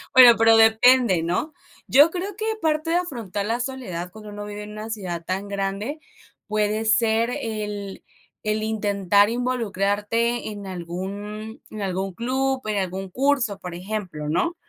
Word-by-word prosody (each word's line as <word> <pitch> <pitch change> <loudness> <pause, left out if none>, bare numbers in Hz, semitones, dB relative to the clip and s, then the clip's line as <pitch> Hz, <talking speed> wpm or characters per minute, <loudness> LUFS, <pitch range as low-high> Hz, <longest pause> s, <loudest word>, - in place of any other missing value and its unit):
Bueno, 245 -2 +10
pero 225 0 +6
depende, 225 -4 +5
¿no? 180 - -1 0.3
Yo 290 +4 +7
creo 370 +3 -4
que 440 - -3 0.2
parte 310 0 0
de 340 - +2
afrontar 230 - -2
la 230 +2 -1
soledad 240 -10 -4
cuando 215 -1 -10
uno 205 0 -7
vive 210 0 -6
en 210 - -9
una 215 +1 -7
ciudad 185 -6 -4
tan 190 +3 -3
grande 200 +8 -3 0.5
puede 215 +1 0
ser 225 +1 +3
el 210 -3 -5 0.4
el 215 0 0
intentar 205 -2 +2
involucrarte 230 -1 0
en 205 -1 -8
algún 200 +5 -6
en 215 - -7
algún 190 0 -2
club, 265 +5 -1
en 210 -1 0
algún 190 0 -3
curso, 250 -3 +1
por 180 -2 -7
ejemplo, 180 -5 -5
¿no? 255 - 0
215 Hz, 150 wpm, -23 LUFS, 195-240 Hz, 0.5 s, Bueno